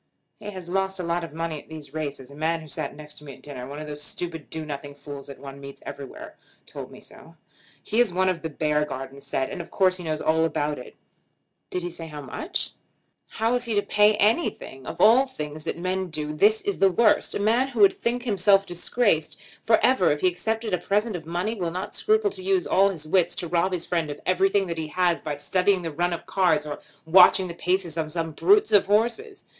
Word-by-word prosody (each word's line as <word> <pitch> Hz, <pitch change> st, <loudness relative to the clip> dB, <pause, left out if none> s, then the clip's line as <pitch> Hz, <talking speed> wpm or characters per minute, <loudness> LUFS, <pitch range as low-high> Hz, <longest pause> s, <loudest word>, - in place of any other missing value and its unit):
"He 210 Hz, -1 st, -7 dB
has 185 Hz, -4 st, -8 dB
lost 190 Hz, +1 st, -1 dB
a -, -, -2 dB
lot 170 Hz, 0 st, -1 dB
of 165 Hz, -, -6 dB
money 160 Hz, -1 st, -4 dB
at -, -, -25 dB
these 155 Hz, -3 st, -9 dB
races. 140 Hz, -4 st, -5 dB
A -, -, -12 dB
man 160 Hz, +2 st, -1 dB
who 155 Hz, -, -11 dB
sat 140 Hz, 0 st, -4 dB
next 150 Hz, 0 st, -11 dB
me 140 Hz, -3 st, -10 dB
at 130 Hz, -, -21 dB
dinner, 130 Hz, -4 st, -7 dB
one 140 Hz, +2 st, -7 dB
of 155 Hz, -, -6 dB
those 150 Hz, -1 st, -7 dB
stupid 160 Hz, 0 st, -4 dB
do 160 Hz, -1 st, -3 dB
nothing 145 Hz, -1 st, -6 dB
fools 140 Hz, -1 st, -9 dB
that 140 Hz, -, -9 dB
one 140 Hz, 0 st, -10 dB
meets 140 Hz, 0 st, -10 dB
everywhere, 140 Hz, -2 st, -9 dB, 0.3 s
told -, -, -8 dB
me -, -, -13 dB
so. -, -, -13 dB, 0.5 s
He 220 Hz, -, 0 dB
is 240 Hz, -5 st, +4 dB
one 185 Hz, +1 st, +1 dB
of 185 Hz, -2 st, 0 dB
the 160 Hz, -, -4 dB
Beargarden 145 Hz, -3 st, -2 dB
set, 135 Hz, -1 st, -2 dB
and 185 Hz, -, -4 dB
of 170 Hz, -, -11 dB
course 185 Hz, -1 st, +2 dB
he 180 Hz, -, -8 dB
knows 155 Hz, -2 st, -2 dB
all 160 Hz, +1 st, +2 dB
about 150 Hz, -3 st, -1 dB
it." 125 Hz, -, -11 dB, 0.7 s
"Did 180 Hz, -, -3 dB
he 175 Hz, -, -3 dB
say 165 Hz, -1 st, -8 dB
how 150 Hz, -2 st, -8 dB
much?" 135 Hz, -, -3 dB, 0.6 s
"How 225 Hz, +2 st, -1 dB
is 245 Hz, 0 st, 0 dB
he 230 Hz, -2 st, -1 dB
to 205 Hz, -, +2 dB
pay 210 Hz, +1 st, +4 dB
anything? 210 Hz, -, 0 dB
Of -, -, -6 dB
all 240 Hz, +6 st, +6 dB
things 150 Hz, -, -7 dB
that -, -, -3 dB
men 185 Hz, +2 st, -2 dB
do 150 Hz, -2 st, -3 dB
this 210 Hz, +8 st, +4 dB
is 405 Hz, 0 st, -2 dB
the 195 Hz, -, +6 dB
worst. 210 Hz, +4 st, +3 dB
A -, -, -1 dB
man 230 Hz, +6 st, +2 dB
who 245 Hz, -5 st, -2 dB
would 195 Hz, -1 st, +7 dB
think 240 Hz, +1 st, -2 dB
himself 200 Hz, -3 st, +3 dB
disgraced 175 Hz, -2 st, 0 dB, 0.2 s
for 225 Hz, -, +5 dB
ever 250 Hz, -9 st, +4 dB
if 150 Hz, -, -1 dB
he -, -, +4 dB
accepted 220 Hz, +4 st, -1 dB
a 180 Hz, -, +2 dB
present 205 Hz, +4 st, 0 dB
of 160 Hz, -2 st, -7 dB
money 175 Hz, +6 st, -1 dB
will 180 Hz, -6 st, -2 dB
not 185 Hz, +4 st, -5 dB
scruple 435 Hz, -1 st, +2 dB
to 375 Hz, -, -9 dB
use 380 Hz, -1 st, +1 dB
all 195 Hz, +1 st, +4 dB
his 160 Hz, -6 st, -4 dB
wits 180 Hz, +2 st, +2 dB
to 175 Hz, -, -2 dB
rob 170 Hz, +3 st, +1 dB
his 180 Hz, -2 st, -2 dB
friend 165 Hz, -3 st, -1 dB
of 145 Hz, -, -6 dB
everything 195 Hz, +2 st, +2 dB
that 170 Hz, -2 st, -4 dB
he 160 Hz, -, -3 dB
has 175 Hz, +1 st, +1 dB
by 150 Hz, -2 st, -3 dB
studying 180 Hz, +6 st, +1 dB
the 165 Hz, -, -3 dB
run 175 Hz, +4 st, 0 dB
of 170 Hz, -, -4 dB
cards 170 Hz, -6 st, +2 dB
or 145 Hz, -1 st, -5 dB
by -, -, -20 dB, 0.2 s
watching 180 Hz, +2 st, +6 dB
the 170 Hz, -, -6 dB
paces 180 Hz, -1 st, -1 dB
of 155 Hz, -1 st, -2 dB
some 165 Hz, 0 st, -2 dB
brutes 410 Hz, -, +4 dB
of 200 Hz, -1 st, +5 dB
horses! 240 Hz, -, 0 dB
175 Hz, 235 wpm, -25 LUFS, 150-205 Hz, 0.7 s, would